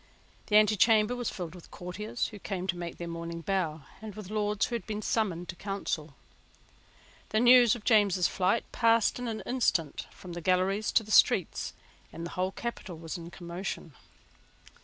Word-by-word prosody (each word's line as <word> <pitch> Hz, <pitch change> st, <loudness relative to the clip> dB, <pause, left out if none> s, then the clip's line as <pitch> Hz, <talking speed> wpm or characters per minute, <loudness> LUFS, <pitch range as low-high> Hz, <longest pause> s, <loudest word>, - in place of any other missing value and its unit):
The 210 Hz, -, +1 dB
antechamber 215 Hz, +2 st, +5 dB
was 245 Hz, -2 st, -2 dB
filled 175 Hz, -3 st, -6 dB
with 180 Hz, -2 st, -13 dB
courtiers 210 Hz, +6 st, -4 dB
who 210 Hz, -, -10 dB
came 185 Hz, -2 st, -4 dB
to 185 Hz, -2 st, -1 dB
make 175 Hz, -1 st, -6 dB
their 170 Hz, -, -5 dB
morning 170 Hz, 0 st, -5 dB
bow 165 Hz, -5 st, -1 dB, 0.2 s
and 215 Hz, -3 st, -8 dB
with 210 Hz, -2 st, -8 dB
Lords 210 Hz, -1 st, +1 dB
who -, -, -7 dB
had 235 Hz, -, -3 dB
been 215 Hz, -1 st, -4 dB
summoned 180 Hz, -6 st, -1 dB
to 185 Hz, -, -4 dB
Council. 170 Hz, -7 st, -4 dB, 1.1 s
The 215 Hz, -, +1 dB
news 245 Hz, -1 st, +7 dB
of 230 Hz, -, -9 dB
James's 200 Hz, -6 st, +4 dB
flight 190 Hz, +5 st, +1 dB
passed 230 Hz, 0 st, +3 dB
in 245 Hz, -, -3 dB
an 220 Hz, -1 st, -3 dB
instant 180 Hz, -, 0 dB
from 180 Hz, -2 st, -11 dB
the 175 Hz, -, -5 dB
galleries 185 Hz, +4 st, +1 dB
to 225 Hz, -, +4 dB
the 215 Hz, -, -9 dB
streets; -, -, +3 dB, 0.4 s
and 165 Hz, -, -6 dB
the 170 Hz, -, -6 dB
whole 185 Hz, +1 st, -1 dB
capital 210 Hz, -6 st, -6 dB
was 165 Hz, +1 st, -6 dB
in 170 Hz, -2 st, -7 dB
commotion. 175 Hz, -2 st, -6 dB
195 Hz, 180 wpm, -29 LUFS, 175-220 Hz, 1.1 s, news